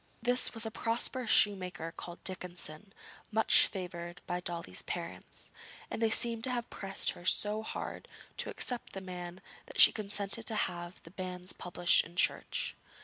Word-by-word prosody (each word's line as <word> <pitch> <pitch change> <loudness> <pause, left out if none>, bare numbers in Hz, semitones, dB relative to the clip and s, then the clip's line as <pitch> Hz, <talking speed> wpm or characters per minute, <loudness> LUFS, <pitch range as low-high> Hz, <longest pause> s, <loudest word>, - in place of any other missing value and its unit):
This 245 +1 +1
was 225 0 +2
a 225 - -3
prosperous 230 +2 0
shoemaker 185 -5 +2
called 175 0 -9
Dickinson, 180 0 -4 0.4
much 220 0 +6
favoured 175 -2 -6
by 175 0 -2
Dolly's 170 - -3
parents, - - -4 0.4
and - - -3
they 225 - +4
seemed 230 0 +3
to - - -2
have 240 -1 -2
pressed 195 -1 -1
her - - -12
so 210 +3 +4
hard 220 - -6 0.3
to - - -2
accept 245 -2 -2
the 195 - -4
man 180 -1 -7 0.3
that - - -7
she - - +11
consented 205 +1 -2
to 225 - +1
have 175 -3 -3
the 165 - -13
banns 185 -1 -5
published 175 -1 +3
in 170 - -13
church. - - 0
190 Hz, 160 wpm, -32 LUFS, 175-225 Hz, 0.4 s, she